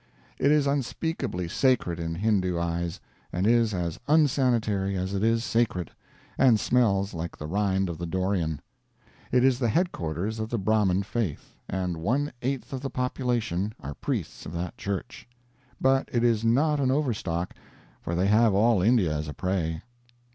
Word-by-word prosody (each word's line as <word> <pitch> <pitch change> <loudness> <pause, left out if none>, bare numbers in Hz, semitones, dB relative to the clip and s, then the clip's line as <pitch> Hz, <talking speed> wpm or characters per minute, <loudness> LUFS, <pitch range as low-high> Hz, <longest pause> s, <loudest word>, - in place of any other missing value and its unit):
It 140 - +3
is 150 -1 +4
unspeakably 140 - -2
sacred 90 -5 +1
in 80 0 -3
Hindoo 95 -2 +1
eyes, 85 0 -2 0.3
and 90 +2 -1
is 115 0 +4
as 85 -4 -3
unsanitary 125 -10 +2
as 95 +1 -2
it 100 +1 -1
is 115 0 +2
sacred, 115 -8 0 0.5
and 120 -5 +5
smells 100 -6 +2
like 85 0 -5
the 75 - -6
rind 95 +2 0
of 85 -2 -5
the 85 - -3
dorian. 90 -4 -1 0.7
It 125 0 +4
is 130 -1 +3
the 120 -3 +1
headquarters 105 - -1
of 110 0 -3
the 120 - -1
Brahmin 100 -2 +2
faith, 105 -6 -4
and 90 -2 -2
one 130 - 0
eighth 135 +1 -3
of 130 - -3
the 135 - -3
population 120 -6 -1
are 70 +2 -6
priests - - -4
of 80 - -7
that 85 +1 -4
church. 100 +7 -5 0.5
But 135 0 +2
it 120 -1 +1
is 115 -2 +2
not 145 +6 +3
an 135 -2 +2
overstock, 105 - -1 0.5
for 85 - -3
they 90 +2 +1
have 105 +1 +4
all 110 -1 +4
India 100 -7 +3
as 75 +1 -3
a 75 - -6
prey. 85 -3 -2
105 Hz, 165 wpm, -27 LUFS, 90-125 Hz, 0.7 s, and